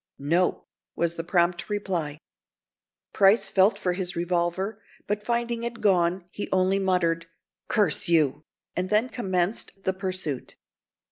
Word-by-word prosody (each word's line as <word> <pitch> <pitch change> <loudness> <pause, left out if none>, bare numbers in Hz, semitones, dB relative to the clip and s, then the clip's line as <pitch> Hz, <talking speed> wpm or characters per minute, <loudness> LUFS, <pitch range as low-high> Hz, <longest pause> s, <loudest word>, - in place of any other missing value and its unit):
"No!" 170 +6 +1 0.3
was 170 -1 0
the 165 - -4
prompt 175 +1 +1
reply. 180 -8 -2 1.0
Price 200 +3 +4
felt 195 +3 +4
for 180 - -1
his 180 -1 -3
revolver, 175 +4 -1 0.2
but 210 0 -1
finding 235 +1 -1
it 235 0 -4
gone, 180 -2 +2
he 205 - -5
only 190 +1 +2
muttered, 170 -3 +1 0.4
"Curse 205 -7 +2
you," 155 -3 +2 0.3
and 185 +1 -1
then 215 +4 +2
commenced 195 -3 -1
the 190 - +1
pursuit. 185 -8 -4
185 Hz, 130 wpm, -26 LUFS, 170-205 Hz, 1.0 s, Price